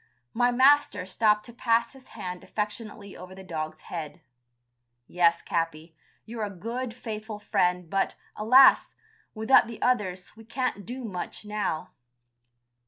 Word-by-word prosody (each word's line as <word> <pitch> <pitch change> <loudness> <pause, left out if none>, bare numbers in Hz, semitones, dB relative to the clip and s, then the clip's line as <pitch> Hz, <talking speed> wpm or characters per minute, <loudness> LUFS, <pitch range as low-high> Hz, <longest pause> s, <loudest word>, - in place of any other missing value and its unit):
My 245 +1 +3
master 260 -5 +4
stopped 210 +2 +2
to 235 - -11
pass 235 -1 +1
his 265 -1 -16
hand 180 0 -6
affectionately 210 -1 -5
over 185 +1 -10
the 190 - -11
dog's 155 -3 -5
head. 165 0 -7 0.9
"Yes, 170 +1 +2
Capi, 165 -2 -3 0.3
you're 230 0 -7
a 205 - -2
good, 230 +6 -5
faithful 215 -2 -6
friend, 180 -3 0
but, 195 +4 0 0.2
alas! 255 +6 +6 0.4
without 220 +3 +5
the 230 - -8
others 190 -8 -1
we 225 - -14
can't 230 -3 -3
do 250 +1 -6
much 195 0 -6
now." 210 -6 -3
210 Hz, 135 wpm, -27 LUFS, 180-235 Hz, 0.9 s, alas